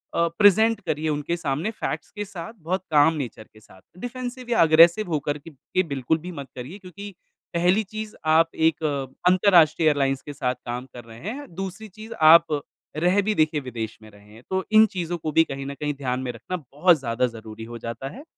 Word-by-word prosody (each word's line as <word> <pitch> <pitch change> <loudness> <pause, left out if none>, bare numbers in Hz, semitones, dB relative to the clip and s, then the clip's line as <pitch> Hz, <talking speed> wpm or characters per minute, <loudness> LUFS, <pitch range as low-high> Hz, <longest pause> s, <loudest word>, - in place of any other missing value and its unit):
अ, 170 - +3
present 215 +2 +5
करिए 155 -3 -2
उनके 150 +3 -1
सामने 155 +6 -2
फैक्ट्स 225 - -5
के 210 -1 -5
साथ, 190 +1 -8
बहुत 180 +2 -2
काम 150 +1 +5
नेचर 125 -7 -5
के 110 - -17
साथ। 95 -3 -19 0.2
डिफ़ेंसिव 250 0 -6
या 235 - +3
एग्रेसिव 165 +6 +6
हो 155 - +1
करके 145 +2 -4
के 185 +6 -2
बिल्कुल 140 +2 0
भी 180 +3 -8
मत 140 -5 -7
करिए 130 +10 -7
क्योंकि 200 +2 -9 0.5
पहली 180 +5 +3
चीज़ 215 +1 -7 0.2
आप 165 0 +3
एक 160 0 +1 0.5
अंतरराष्ट्रीय 170 -4 +5
एयरलाइंस 135 -2 +1
के 145 - -8
साथ 125 -2 -1
काम 125 +1 -4
कर 120 - -9
रहे 115 0 -12
हैं। 285 +5 -7
दूसरी 195 +4 -6
चीज़, 215 +4 -10
आप 160 -3 +6 0.4
रह 180 +5 +3
भी 210 +1 -1
देखिए 155 -1 +2
विदेश 115 -4 -6
में 110 - -14
रहे 105 0 -18
हैं, 115 +2 -15
तो 190 0 0
इन 220 0 +8
चीजों 175 -1 -2
को 155 0 -3
भी 165 +2 +5
कहीं 135 -3 -6
न 140 - -4
कहीं 150 0 -1
ध्यान 130 -2 -2
में 130 -1 -3
रखना 180 +10 -5
बहुत 155 +3 +2
ज़्यादा 125 0 0
ज़रूरी 110 0 -9
हो - - -5
जाता 115 +4 -6
है। 280 - -11
160 Hz, 205 wpm, -24 LUFS, 135-190 Hz, 0.5 s, इन